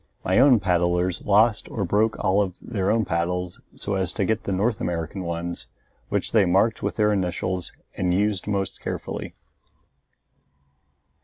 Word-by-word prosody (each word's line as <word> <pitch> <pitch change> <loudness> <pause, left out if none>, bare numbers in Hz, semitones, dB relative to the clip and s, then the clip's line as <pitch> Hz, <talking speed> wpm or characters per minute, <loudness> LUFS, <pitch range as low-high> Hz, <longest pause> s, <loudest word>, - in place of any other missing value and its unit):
My - - +3
own 130 -3 +6
paddlers 90 -1 +1
lost 105 +2 +3
or 100 - -2
broke 110 +5 +1
all 100 0 +2
of 95 -3 -2
their 100 -5 -2
own 110 -1 +2
paddles 90 +1 -2 0.2
so 100 - -4
as 95 -2 -1
to 100 - 0
get 110 +1 -1
the - - -2
North 105 +3 0
American 85 +2 -3
ones, 85 0 -4 0.4
which - - -1
they 110 -3 +5
marked 95 +5 +2
with - - -2
their 105 -1 +3
initials 90 -1 -2 0.2
and 90 -1 0
used 100 +1 0
most 100 -2 -2
carefully. - - -5
95 Hz, 155 wpm, -24 LUFS, 90-105 Hz, 0.4 s, own